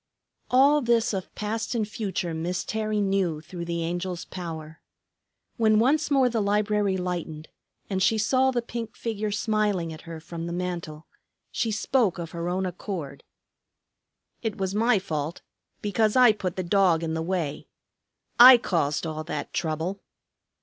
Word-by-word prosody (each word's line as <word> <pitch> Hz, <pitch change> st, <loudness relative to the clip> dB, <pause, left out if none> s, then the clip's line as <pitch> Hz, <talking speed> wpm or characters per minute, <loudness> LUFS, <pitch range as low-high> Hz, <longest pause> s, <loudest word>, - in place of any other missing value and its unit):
All 280 Hz, +4 st, +5 dB
this 235 Hz, -3 st, +2 dB
of 190 Hz, -2 st, -4 dB
past 220 Hz, +3 st, -3 dB
and 220 Hz, -3 st, 0 dB
future 190 Hz, -5 st, -3 dB
Miss 170 Hz, +3 st, -3 dB
Terry 215 Hz, -1 st, -1 dB
knew 195 Hz, -5 st, 0 dB
through 170 Hz, +2 st, -7 dB
the 170 Hz, -1 st, -2 dB
Angel's 175 Hz, +1 st, -3 dB
power. 160 Hz, -3 st, -7 dB, 0.8 s
When 220 Hz, -2 st, +4 dB
once 285 Hz, +8 st, +3 dB
more 270 Hz, -3 st, +4 dB
the 230 Hz, -3 st, 0 dB
library 205 Hz, -1 st, +1 dB
lightened, 170 Hz, -4 st, -4 dB, 0.4 s
and 190 Hz, -2 st, -2 dB
she 220 Hz, +4 st, +3 dB
saw 260 Hz, +5 st, +3 dB
the 245 Hz, -2 st, -1 dB
pink 230 Hz, -1 st, -6 dB
figure 215 Hz, -2 st, -3 dB
smiling 205 Hz, -5 st, 0 dB
at 155 Hz, -, -10 dB
her 165 Hz, -1 st, -6 dB
from 165 Hz, +1 st, -7 dB
the 170 Hz, -, -4 dB
mantel, 170 Hz, -3 st, -4 dB, 0.5 s
she 230 Hz, -, -1 dB
spoke 220 Hz, -1 st, +1 dB
of 170 Hz, -2 st, -6 dB
her 170 Hz, 0 st, -3 dB
own 185 Hz, +1 st, -1 dB
accord. 175 Hz, -6 st, -6 dB, 1.2 s
"It 225 Hz, -3 st, -3 dB
was 190 Hz, -1 st, -2 dB
my 225 Hz, +2 st, +3 dB
fault, 160 Hz, -4 st, -4 dB, 0.4 s
because 210 Hz, +1 st, +1 dB
I 250 Hz, -3 st, +7 dB
put 190 Hz, -4 st, -4 dB
the 185 Hz, -, -2 dB
dog 175 Hz, -2 st, +3 dB
in 160 Hz, -1 st, -2 dB
the 160 Hz, -, -2 dB
way. 165 Hz, -4 st, -3 dB, 0.7 s
I 250 Hz, +1 st, +11 dB
caused 165 Hz, -9 st, -1 dB
all 155 Hz, -1 st, -4 dB
that 150 Hz, -3 st, -5 dB
trouble." 165 Hz, +4 st, -2 dB
190 Hz, 155 wpm, -26 LUFS, 170-220 Hz, 1.2 s, I